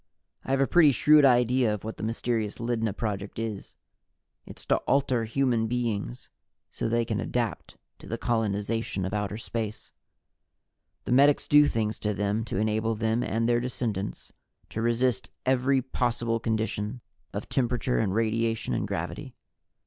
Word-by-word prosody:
I -, -, -10 dB
have 135 Hz, 0 st, +2 dB
a -, -, +5 dB
pretty 155 Hz, -1 st, +5 dB
shrewd 150 Hz, +2 st, +6 dB
idea 125 Hz, -2 st, +4 dB
of 105 Hz, -2 st, -4 dB
what 110 Hz, +1 st, -6 dB
the -, -, -8 dB
mysterious 110 Hz, -1 st, -2 dB
Lydna 115 Hz, -2 st, -1 dB
Project 100 Hz, -1 st, -4 dB
is. 110 Hz, -3 st, -5 dB, 0.7 s
It's -, -, -10 dB
to -, -, +3 dB
alter 130 Hz, -4 st, +2 dB
human 120 Hz, -1 st, +1 dB
beings 110 Hz, -, -3 dB, 0.4 s
so -, -, -3 dB
they 115 Hz, 0 st, +1 dB
can 110 Hz, -1 st, -2 dB
adapt 115 Hz, -8 st, -3 dB, 0.2 s
to -, -, -12 dB
the 115 Hz, -, -3 dB
colonization 110 Hz, -3 st, -1 dB
of 95 Hz, -, -4 dB
outer 105 Hz, 0 st, -2 dB
space. 110 Hz, -1 st, -5 dB, 1.1 s
The -, -, -3 dB
medics 140 Hz, +3 st, +4 dB
do 145 Hz, 0 st, +6 dB
things 110 Hz, -3 st, -1 dB
to 105 Hz, -1 st, -1 dB
them 105 Hz, +2 st, 0 dB
to 105 Hz, -, -4 dB
enable 110 Hz, +2 st, 0 dB
them 110 Hz, +2 st, 0 dB
and 115 Hz, -1 st, 0 dB
their 120 Hz, 0 st, +3 dB
descendants 115 Hz, -5 st, -4 dB, 0.4 s
to 110 Hz, -, -3 dB
resist 120 Hz, 0 st, +1 dB, 0.2 s
every 130 Hz, +1 st, +2 dB
possible 120 Hz, -3 st, -1 dB
condition 110 Hz, +1 st, -2 dB, 0.3 s
of -, -, -5 dB
temperature 125 Hz, 0 st, 0 dB
and 105 Hz, -4 st, +1 dB
radiation 115 Hz, +1 st, 0 dB
and -, -, -1 dB
gravity. -, -, -5 dB
115 Hz, 155 wpm, -27 LUFS, 110-125 Hz, 1.1 s, shrewd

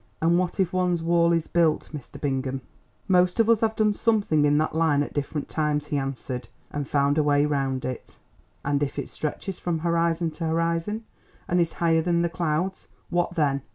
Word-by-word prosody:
"And 170 Hz, +2 st, +3 dB
what 185 Hz, +2 st, -2 dB
if 185 Hz, -2 st, +1 dB
one's 180 Hz, -2 st, +1 dB
wall 170 Hz, 0 st, +3 dB
is 165 Hz, -2 st, +1 dB
built, 165 Hz, -3 st, +1 dB
Mr. 145 Hz, -4 st, -8 dB
Bingham?" 135 Hz, -2 st, -2 dB, 0.5 s
"Most 180 Hz, +1 st, +3 dB
of 225 Hz, -, +5 dB
us 230 Hz, -2 st, +4 dB
have 220 Hz, -1 st, +1 dB
done 215 Hz, -1 st, +3 dB
something 205 Hz, -10 st, +2 dB
in 145 Hz, 0 st, +3 dB
that 155 Hz, +1 st, +1 dB
line 155 Hz, -3 st, +2 dB
at -, -, -7 dB
different 145 Hz, 0 st, -3 dB
times," 150 Hz, -1 st, -1 dB
he 145 Hz, -, 0 dB
answered, 130 Hz, -2 st, -4 dB, 0.2 s
"and 145 Hz, -2 st, -3 dB
found 140 Hz, +1 st, +2 dB
a -, -, +3 dB
way 145 Hz, 0 st, +3 dB
round 135 Hz, -3 st, -1 dB
it." 130 Hz, -2 st, -6 dB, 0.5 s
"And 140 Hz, 0 st, +1 dB
if 145 Hz, -1 st, -2 dB
it 140 Hz, -, -4 dB
stretches 175 Hz, +5 st, -4 dB
from 175 Hz, -2 st, -1 dB
horizon 170 Hz, 0 st, +1 dB
to 165 Hz, +1 st, -4 dB
horizon, 165 Hz, +6 st, -1 dB, 0.4 s
and 175 Hz, 0 st, +2 dB
is 165 Hz, -, 0 dB
higher 165 Hz, -1 st, +2 dB
than 170 Hz, 0 st, +1 dB
the 170 Hz, -, +1 dB
clouds, 170 Hz, +2 st, -2 dB, 0.2 s
what 175 Hz, 0 st, 0 dB
then?" 140 Hz, -4 st, +1 dB
165 Hz, 195 wpm, -25 LUFS, 145-175 Hz, 0.5 s, of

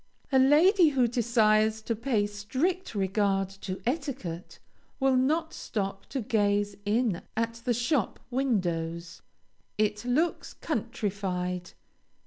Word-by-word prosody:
A 265 Hz, -, +5 dB
lady 320 Hz, +7 st, +6 dB
who 260 Hz, -4 st, +2 dB
desires 220 Hz, -2 st, +2 dB
to 230 Hz, -, -1 dB
pay 230 Hz, -2 st, 0 dB
strict 255 Hz, -, -2 dB
regard 195 Hz, 0 st, +1 dB
to 195 Hz, -1 st, -6 dB
etiquette, 245 Hz, -, -4 dB, 0.4 s
will 270 Hz, -1 st, +3 dB
not 315 Hz, +6 st, +1 dB
stop 195 Hz, -2 st, -4 dB
to 270 Hz, -, -3 dB
gaze 205 Hz, -3 st, +1 dB
in 215 Hz, -3 st, +1 dB, 0.2 s
at 230 Hz, 0 st, -2 dB
the 245 Hz, -, +2 dB
shop 240 Hz, -, 0 dB
windows. 175 Hz, -10 st, -1 dB, 0.6 s
It 210 Hz, 0 st, 0 dB
looks 290 Hz, +8 st, 0 dB
countrified. 180 Hz, -3 st, -3 dB
220 Hz, 115 wpm, -28 LUFS, 195-260 Hz, 0.6 s, lady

